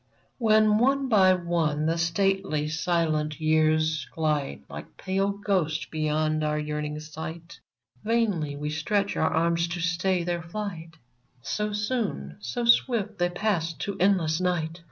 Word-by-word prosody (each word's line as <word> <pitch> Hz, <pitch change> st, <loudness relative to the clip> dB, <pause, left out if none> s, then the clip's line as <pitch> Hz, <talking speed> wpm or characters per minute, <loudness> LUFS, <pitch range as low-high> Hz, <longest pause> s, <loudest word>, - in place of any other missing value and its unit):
When, 215 Hz, -2 st, +4 dB
one 270 Hz, +2 st, +2 dB
by 190 Hz, -5 st, +5 dB
one, 165 Hz, -4 st, 0 dB
the 165 Hz, +1 st, 0 dB
stately, 170 Hz, -3 st, 0 dB
silent 155 Hz, -2 st, 0 dB
Years 155 Hz, -2 st, +2 dB
Glide 150 Hz, -, -1 dB
like 75 Hz, +1 st, -10 dB
pale 195 Hz, +1 st, 0 dB
ghosts 190 Hz, -6 st, -1 dB
beyond 155 Hz, 0 st, 0 dB
our 150 Hz, 0 st, 0 dB
yearning 150 Hz, 0 st, -3 dB
sight, 160 Hz, +2 st, -8 dB, 0.4 s
Vainly 205 Hz, -11 st, 0 dB
we 150 Hz, +1 st, -4 dB
stretch 195 Hz, +6 st, 0 dB
our -, -, +2 dB
arms 170 Hz, +1 st, +1 dB
to 175 Hz, +1 st, -4 dB
stay 180 Hz, +1 st, 0 dB
their 175 Hz, 0 st, -2 dB
flight, 170 Hz, -2 st, -6 dB, 0.5 s
So 210 Hz, -, -2 dB
soon, 205 Hz, -, -2 dB
so 120 Hz, -, -3 dB
swift 225 Hz, -3 st, +2 dB
they 175 Hz, 0 st, +2 dB
pass 175 Hz, -3 st, -1 dB
to 200 Hz, +5 st, -4 dB
endless 180 Hz, -4 st, +2 dB
night 170 Hz, -2 st, -1 dB
170 Hz, 135 wpm, -26 LUFS, 155-195 Hz, 0.5 s, by